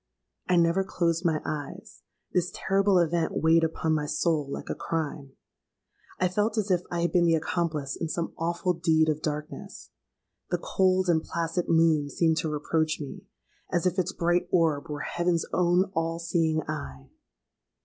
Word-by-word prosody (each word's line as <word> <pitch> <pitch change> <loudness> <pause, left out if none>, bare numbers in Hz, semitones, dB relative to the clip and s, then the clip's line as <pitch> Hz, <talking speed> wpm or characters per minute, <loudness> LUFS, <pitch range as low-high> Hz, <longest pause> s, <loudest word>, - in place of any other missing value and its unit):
I 180 - +4
never 170 +2 +3
closed 170 -2 0
my 160 -3 +1
eyes: 145 - -6 0.3
this 180 0 +1
terrible 195 0 +2
event 170 -1 +1
weighed 165 +1 +4
upon 160 0 0
my 150 -1 0
soul 150 -1 0
like - - -6
a - - -2
crime. 150 -4 -4 0.9
I 185 - +3
felt 210 +5 0
as 210 -2 0
if 180 -1 +3
I 170 -1 -2
had 170 - +1
been 175 -2 +3
the 165 -1 +4
accomplice 155 -3 -2
in 165 - -3
some 170 +1 -3
awful 170 +2 -1
deed 160 -2 +2
of 155 0 -1
darkness. 150 0 -6 0.6
The - - +1
cold 185 -1 +1
and 165 -2 +3
placid 170 +1 -2
moon 160 -3 +3
seemed 160 +3 +1
to 160 - -1
reproach 155 +1 0
me—as 165 +4 -6
if 185 +1 +1
its 185 +1 0
bright 175 0 +1
orb 165 -3 +2
were 145 -1 -4
heaven's 175 -1 0
own 180 +2 +2
all 165 0 -1
seeing 165 -2 0
eye! 70 - -6
165 Hz, 165 wpm, -27 LUFS, 155-175 Hz, 0.9 s, I